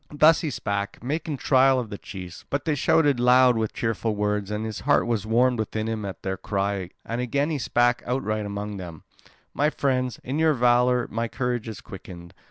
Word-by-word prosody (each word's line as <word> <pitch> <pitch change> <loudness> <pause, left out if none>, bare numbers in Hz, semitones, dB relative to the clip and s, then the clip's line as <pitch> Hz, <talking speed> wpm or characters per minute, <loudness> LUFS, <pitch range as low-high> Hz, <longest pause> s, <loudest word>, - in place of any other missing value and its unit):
Thus 155 +2 +5
he 160 - -2
spake, 100 -4 -3
making 150 +2 -2
trial 130 0 +4
of 115 -4 -5
the 100 - -5
chiefs; 90 -3 -9
but 140 0 -2
they 160 - +1
shouted 145 -1 +3
loud 125 0 +5
with 110 -1 -1
cheerful 115 -1 -2
words. 105 -1 -1
And 105 +1 -3
his 110 -2 -5
heart 145 +1 +2
was 110 -3 -1
warmed 120 +2 +3
within 110 0 -2
him 110 -2 -3
at 95 - -7
their 95 0 -2
cry 100 -2 -2 0.2
and 115 +2 -3
again 140 +5 0
he 150 - -1
spake 120 0 +2
outright 110 -4 -1
among 100 0 -5
them: 85 -4 -9 0.5
"My 150 +2 +2
friends, 130 -5 -1
in 135 +5 -2
your 160 -2 +3
valour 125 0 +3
my 115 +1 -1
courage 120 -1 -2
is 110 - -7
quickened. 90 -2 -11
115 Hz, 195 wpm, -25 LUFS, 105-130 Hz, 0.5 s, Thus